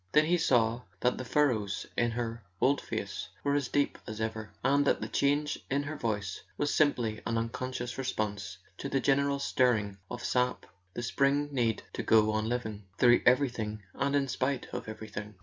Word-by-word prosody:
Then 150 Hz, +1 st, +6 dB
he 175 Hz, +2 st, +2 dB
saw 120 Hz, -5 st, +3 dB, 0.2 s
that 125 Hz, 0 st, +2 dB
the -, -, -3 dB
furrows 115 Hz, -7 st, +1 dB
in 120 Hz, -, +2 dB
her 115 Hz, 0 st, -3 dB, 0.2 s
old 140 Hz, +2 st, +3 dB
face -, -, -4 dB
were 140 Hz, -, +2 dB
as 145 Hz, -3 st, +1 dB
deep 145 Hz, +2 st, 0 dB
as 110 Hz, -1 st, -6 dB
ever, 110 Hz, -1 st, -3 dB
and 140 Hz, +2 st, +4 dB
that -, -, +3 dB
the -, -, -3 dB
change 145 Hz, +1 st, +1 dB
in 140 Hz, +2 st, +1 dB
her 150 Hz, +2 st, -4 dB
voice 105 Hz, -7 st, -2 dB, 0.2 s
was 145 Hz, -, 0 dB
simply 120 Hz, -8 st, +2 dB
an 115 Hz, -, 0 dB
unconscious 120 Hz, +2 st, -3 dB
response 105 Hz, -7 st, -2 dB, 0.2 s
to 140 Hz, -, -3 dB
the 135 Hz, -, +1 dB
general 140 Hz, +2 st, +2 dB
stirring 110 Hz, -7 st, +1 dB
of 120 Hz, -, -6 dB
sap, 125 Hz, 0 st, +1 dB, 0.3 s
the 120 Hz, -, -3 dB
spring 140 Hz, +4 st, +2 dB
need 120 Hz, -5 st, 0 dB
to -, -, -2 dB
go 110 Hz, -1 st, +4 dB
on 110 Hz, +1 st, 0 dB
living, 110 Hz, -5 st, -3 dB
through 120 Hz, -1 st, +6 dB
everything 120 Hz, -5 st, +2 dB
and 140 Hz, +1 st, 0 dB
in 140 Hz, -1 st, +2 dB
spite 130 Hz, 0 st, -1 dB
of -, -, -4 dB
everything. 105 Hz, -1 st, -7 dB
120 Hz, 185 wpm, -30 LUFS, 110-140 Hz, 0.3 s, Then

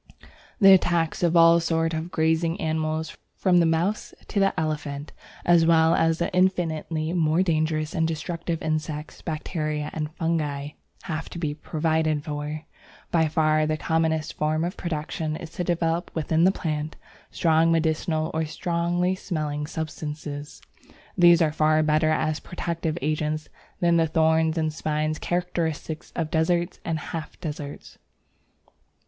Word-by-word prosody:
The 195 Hz, -3 st, +9 dB
attacks 170 Hz, -3 st, +2 dB
of 170 Hz, -1 st, +3 dB
all 165 Hz, 0 st, +7 dB
sorts 165 Hz, 0 st, 0 dB
of 160 Hz, +2 st, -3 dB
grazing 160 Hz, 0 st, +1 dB
animals, 160 Hz, 0 st, -2 dB, 0.2 s
from 180 Hz, -2 st, +3 dB
the 170 Hz, -, +4 dB
mouse 170 Hz, +6 st, -1 dB
to 205 Hz, -, 0 dB
the 195 Hz, -3 st, +2 dB
elephant, 150 Hz, -2 st, -3 dB, 0.3 s
as 170 Hz, -1 st, +5 dB
well 165 Hz, 0 st, +5 dB
as 165 Hz, -1 st, +2 dB
the 170 Hz, -, -2 dB
infinitely 165 Hz, -3 st, 0 dB
more 165 Hz, 0 st, +2 dB
dangerous 155 Hz, -2 st, 0 dB
and 165 Hz, -3 st, +1 dB
destructive 165 Hz, +1 st, -3 dB
insects, 155 Hz, -1 st, -3 dB
bacteria, 155 Hz, -2 st, -3 dB
and 155 Hz, -1 st, -3 dB
fungi, 150 Hz, -4 st, -1 dB, 0.3 s
have 160 Hz, -1 st, -4 dB
to -, -, -8 dB
be 155 Hz, -4 st, -2 dB
provided 155 Hz, 0 st, 0 dB
for. 150 Hz, +1 st, -5 dB, 0.5 s
By 165 Hz, -2 st, +3 dB
far 155 Hz, -1 st, +2 dB
the 155 Hz, 0 st, 0 dB
commonest 160 Hz, -1 st, 0 dB
form 155 Hz, +1 st, 0 dB
of 180 Hz, +3 st, -2 dB
protection 155 Hz, -1 st, -3 dB
is 165 Hz, 0 st, -8 dB
to 180 Hz, -, -3 dB
develop 170 Hz, -1 st, 0 dB
within 160 Hz, +1 st, +2 dB
the 190 Hz, -, +6 dB
plant 155 Hz, -4 st, -3 dB, 0.3 s
strong 165 Hz, 0 st, +3 dB
medicinal 160 Hz, -1 st, 0 dB
or 160 Hz, +1 st, 0 dB
strongly 175 Hz, +3 st, 0 dB
smelling 150 Hz, -5 st, -3 dB
substances. 150 Hz, -2 st, -6 dB, 0.5 s
These 175 Hz, -1 st, +6 dB
are 155 Hz, -, +2 dB
far 155 Hz, 0 st, +3 dB
better 155 Hz, +1 st, +2 dB
as 155 Hz, 0 st, 0 dB
protective 170 Hz, -2 st, -3 dB
agents 155 Hz, 0 st, -1 dB, 0.3 s
than 170 Hz, -1 st, +3 dB
the 165 Hz, -1 st, +3 dB
thorns 160 Hz, +1 st, +2 dB
and 155 Hz, -1 st, 0 dB
spines 155 Hz, 0 st, -1 dB
characteristic 170 Hz, -3 st, -2 dB
of 160 Hz, -2 st, -2 dB
deserts 170 Hz, +2 st, +1 dB
and 165 Hz, -1 st, -1 dB
half 155 Hz, -1 st, -6 dB
deserts. 150 Hz, -2 st, -7 dB
160 Hz, 140 wpm, -25 LUFS, 155-170 Hz, 0.5 s, The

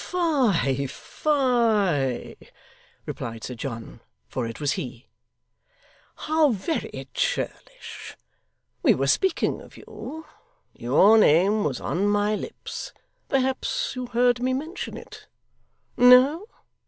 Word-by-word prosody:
'Fie, 240 Hz, -, +1 dB
fie!' 220 Hz, -, 0 dB, 0.7 s
replied 115 Hz, -1 st, -6 dB
Sir 125 Hz, -, -5 dB
John 115 Hz, -, -7 dB, 0.3 s
(for 125 Hz, -3 st, -3 dB
it 115 Hz, -, -8 dB
was 145 Hz, -2 st, 0 dB
he), 125 Hz, -1 st, -6 dB, 1.1 s
'how 310 Hz, -1 st, +2 dB
very 240 Hz, -, -3 dB
churlish! -, -, -4 dB, 0.6 s
We -, -, +4 dB
were -, -, 0 dB
speaking 380 Hz, -1 st, +1 dB
of -, -, -15 dB
you. 320 Hz, +1 st, -9 dB, 0.5 s
Your 190 Hz, -, +4 dB
name 200 Hz, +5 st, +4 dB
was 135 Hz, -5 st, -2 dB
on 195 Hz, +4 st, -1 dB
my 205 Hz, +1 st, +1 dB
lips 215 Hz, -, -6 dB, 0.4 s
perhaps 265 Hz, -, 0 dB
you 255 Hz, -1 st, -4 dB
heard 245 Hz, 0 st, +2 dB
me 255 Hz, +1 st, +1 dB
mention 315 Hz, +7 st, -5 dB
it? -, -, -12 dB, 0.7 s
No? 260 Hz, -, +6 dB
225 Hz, 105 wpm, -25 LUFS, -, 1.1 s, No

